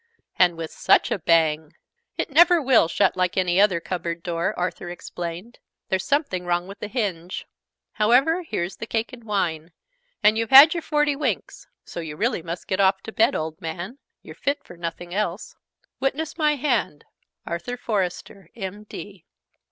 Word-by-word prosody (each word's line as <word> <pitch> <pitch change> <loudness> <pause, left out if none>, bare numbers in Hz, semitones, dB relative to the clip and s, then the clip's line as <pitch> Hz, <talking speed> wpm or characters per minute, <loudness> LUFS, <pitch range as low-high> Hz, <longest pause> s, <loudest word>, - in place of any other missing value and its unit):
And 175 -2 +4
with 165 -1 -5
such - - +3
a - - 0
bang! 160 -2 +2 0.4
"It - - -2
never 345 +4 +6
will 260 - +4
shut - - +2
like 185 0 0
any 180 0 +3
other 195 -5 +3
cupboard 170 -1 -4
door," 170 -1 -1
Arthur 180 0 -3
explained. 175 +5 -7 0.3
"There's 190 -1 0
something 280 - 0
wrong 175 0 0
with 200 +1 -10
the - - -5
hinge. 190 -7 -3 0.5
However, 255 +11 +3
here's 185 - -4
the 225 - -6
cake 225 +2 -2
and 240 -2 -11
wine. 175 -6 -2 0.5
And 215 +1 +5
you've 230 - -1
had 275 +4 +10
your 340 - -3
forty 295 -2 +1
winks. 295 - -3 0.2
So - - -7
you 160 -3 -6
really 225 +1 0
must 170 +1 -6
get 190 - -2
off 190 0 +3
to 220 - -7
bed, 220 - +3
old 160 +3 -4
man! 175 +10 -6 0.2
You're - - -10
fit 285 +1 -2
for 175 - -13
nothing 175 +1 -6
else. 195 -1 -3 0.4
Witness 285 +4 -2
my 305 -2 +2
hand, 245 - -1 0.4
Arthur 170 +9 -4
Forester, 195 -4 -3
M.D." 200 -2 -8
190 Hz, 165 wpm, -24 LUFS, 170-245 Hz, 0.5 s, had